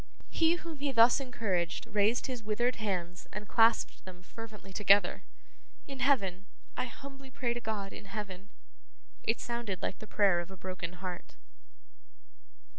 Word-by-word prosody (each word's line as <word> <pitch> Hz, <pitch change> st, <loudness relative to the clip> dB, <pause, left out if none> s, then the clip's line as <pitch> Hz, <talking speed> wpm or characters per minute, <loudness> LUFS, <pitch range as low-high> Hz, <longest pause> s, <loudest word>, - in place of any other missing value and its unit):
He 330 Hz, 0 st, +4 dB
whom 330 Hz, -3 st, -7 dB
he 285 Hz, 0 st, 0 dB
thus 235 Hz, +1 st, +6 dB
encouraged, 200 Hz, -10 st, -1 dB
raised 210 Hz, +3 st, +2 dB
his 255 Hz, -3 st, -4 dB
withered 230 Hz, +4 st, 0 dB
hands 180 Hz, -4 st, -3 dB
and 210 Hz, 0 st, -6 dB
clasped 230 Hz, 0 st, +4 dB
them 180 Hz, -1 st, -11 dB
fervently 210 Hz, -2 st, -10 dB
together. 200 Hz, 0 st, +4 dB, 0.7 s
'In 275 Hz, -2 st, -7 dB
heaven. 195 Hz, -8 st, +2 dB, 0.3 s
I -, -, -1 dB
humbly 275 Hz, +2 st, -10 dB
pray 245 Hz, -2 st, -1 dB
to 240 Hz, -, -5 dB
God 210 Hz, -3 st, -3 dB
in -, -, -9 dB
heaven.' 200 Hz, -1 st, -6 dB, 0.7 s
It 225 Hz, -, +1 dB
sounded 235 Hz, -6 st, -3 dB
like -, -, -2 dB
the 215 Hz, -, -9 dB
prayer 195 Hz, -5 st, +4 dB
of 175 Hz, +1 st, -5 dB
a 190 Hz, -, -10 dB
broken 185 Hz, -2 st, -5 dB
heart. 180 Hz, -1 st, -6 dB
210 Hz, 150 wpm, -32 LUFS, 190-245 Hz, 0.7 s, thus